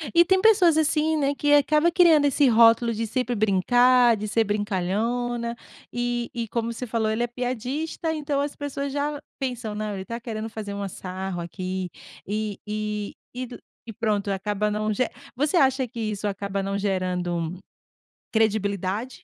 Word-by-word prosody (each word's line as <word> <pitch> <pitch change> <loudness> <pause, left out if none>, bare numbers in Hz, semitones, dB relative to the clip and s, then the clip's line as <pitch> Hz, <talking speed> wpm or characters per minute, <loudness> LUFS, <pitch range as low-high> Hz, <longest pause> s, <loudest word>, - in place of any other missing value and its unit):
e 340 - +7
tem 380 +2 +3
pessoas 375 -7 +5
assim, 315 0 +2
né, 285 -1 +1
que 290 +1 +2
acaba 300 +3 +4
criando 330 -4 +5
esse 285 0 +4
rótulo 230 0 +5
de 225 +1 -2
sempre 245 +2 -1
brincar, 240 +4 +4
de 210 +1 -4
ser 225 +2 +2
brincalhona, 220 +4 -1 0.4
e 240 0 -1
e 235 -2 -3
como 230 +1 -2
você 250 +2 -6
falou: 220 -1 0
"Ele 225 +2 0
é 240 - 0
piadista", 255 +7 -3
então 290 -2 -1
as 285 0 -3
pessoas 280 -1 -4
já 290 +1 -2 0.2
pensam 245 -5 -3
não 210 -1 -3
ele 190 - -5
está 230 +3 -5
querendo 225 -2 -5
fazer 215 -2 -6
um 200 0 -3
sarro 185 -1 -5
aqui, 185 +1 -4 0.4
e 210 0 -2
e 210 -1 -3 0.2
e 255 0 -3
do, 245 - -10 0.3
e 225 - -8
pronto 210 -3 -1
acaba 205 +2 -1
não 215 +1 -1
ge 250 +3 +1 0.3
você 295 +6 +1
acha 265 -3 +3
que 230 - -9
isso 210 -2 -2
acaba 200 0 -3
não 195 +1 -2
gerando, 180 -3 -1 0.8
credibilidade? 205 0 0
230 Hz, 170 wpm, -25 LUFS, 205-260 Hz, 0.8 s, e